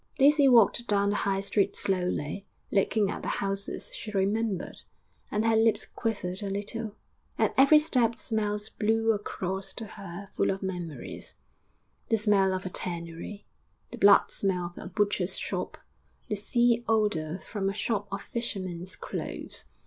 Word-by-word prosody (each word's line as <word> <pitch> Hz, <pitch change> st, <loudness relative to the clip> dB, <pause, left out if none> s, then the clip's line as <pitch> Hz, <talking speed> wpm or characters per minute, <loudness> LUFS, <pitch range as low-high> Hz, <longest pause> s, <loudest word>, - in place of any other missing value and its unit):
XV -, -, -34 dB
Daisy 285 Hz, +1 st, +6 dB
walked 235 Hz, -1 st, +5 dB
down 200 Hz, -1 st, +3 dB
the -, -, 0 dB
High 195 Hz, -1 st, 0 dB
Street 200 Hz, 0 st, +1 dB
slowly, 180 Hz, -2 st, -1 dB, 0.2 s
looking 200 Hz, 0 st, +2 dB
at -, -, -5 dB
the -, -, -5 dB
houses 195 Hz, 0 st, -3 dB
she 220 Hz, -, -6 dB
remembered, 205 Hz, 0 st, -1 dB, 0.5 s
and 210 Hz, +1 st, 0 dB
her 225 Hz, 0 st, +4 dB
lips 225 Hz, 0 st, +3 dB
quivered 195 Hz, -5 st, -3 dB
a 200 Hz, -, -3 dB
little; 210 Hz, +2 st, -4 dB, 0.4 s
at -, -, +2 dB
every 275 Hz, +3 st, +7 dB
step 245 Hz, -7 st, +2 dB
smells 210 Hz, -2 st, -1 dB
blew 225 Hz, +1 st, +1 dB
across 195 Hz, -2 st, -3 dB
to 225 Hz, -, -6 dB
her 195 Hz, -1 st, -9 dB
full -, -, +2 dB
of 195 Hz, +1 st, -2 dB
memories 175 Hz, -5 st, -5 dB, 0.7 s
the 225 Hz, -, +4 dB
smell 200 Hz, -2 st, +3 dB
of 185 Hz, 0 st, -3 dB
a -, -, -2 dB
tannery, 170 Hz, +3 st, -4 dB, 0.5 s
the -, -, -8 dB
blood 200 Hz, 0 st, +6 dB
smell 180 Hz, -3 st, -1 dB
of -, -, -8 dB
a -, -, -7 dB
butcher's 195 Hz, -1 st, 0 dB
shop, -, -, -3 dB, 0.5 s
the 210 Hz, -, 0 dB
sea 235 Hz, +3 st, +2 dB
odour 205 Hz, -8 st, +1 dB
from 195 Hz, -3 st, -1 dB
a -, -, -2 dB
shop 205 Hz, -2 st, -1 dB
of 195 Hz, -, -4 dB
fishermen's 185 Hz, -6 st, -4 dB
clothes.... -, -, -5 dB
200 Hz, 155 wpm, -28 LUFS, 190-225 Hz, 0.7 s, every